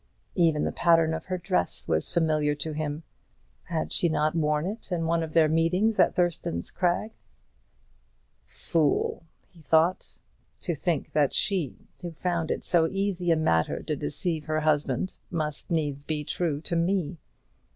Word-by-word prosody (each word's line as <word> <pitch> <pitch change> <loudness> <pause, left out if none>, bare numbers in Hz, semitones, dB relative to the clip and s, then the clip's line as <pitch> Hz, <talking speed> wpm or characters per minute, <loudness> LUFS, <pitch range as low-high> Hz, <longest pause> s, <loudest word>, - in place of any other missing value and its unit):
Even 160 -3 +3
the - - 0
pattern 165 -2 +3
of 160 0 -4
her 185 0 -2
dress 180 +1 -1
was - - 0
familiar 155 -3 +2
to 150 +2 -3
him. 150 +1 -3 0.6
Had 165 -2 -2
she 170 - +2
not 155 -1 +1
worn 150 -1 +1
it 205 +1 -6
in 170 -2 0
one 165 0 +1
of 160 -1 -5
their 160 -2 +5
meetings 180 +7 +2
at - - +4
Thurston's 170 - -1
Crag? 180 +4 0 1.4
"Fool!" 160 -2 0 0.3
he 170 - -19
thought, 160 +5 +2 0.4
"to 175 - -1
think 165 0 -2
that 145 -3 +2
she, 185 - -1
who 175 - -4
found 170 0 -2
it - - -2
so 165 -2 +3
easy 195 -2 -1
a 165 - +5
matter 80 - +1
to - - -2
deceive 155 - -3
her 155 0 0
husband, 150 +1 0
must 155 -4 -3
needs 145 -4 -1
be 150 0 -2
true 150 -1 -1
to 170 - -2
me. 170 -2 0
165 Hz, 160 wpm, -27 LUFS, 150-175 Hz, 1.4 s, their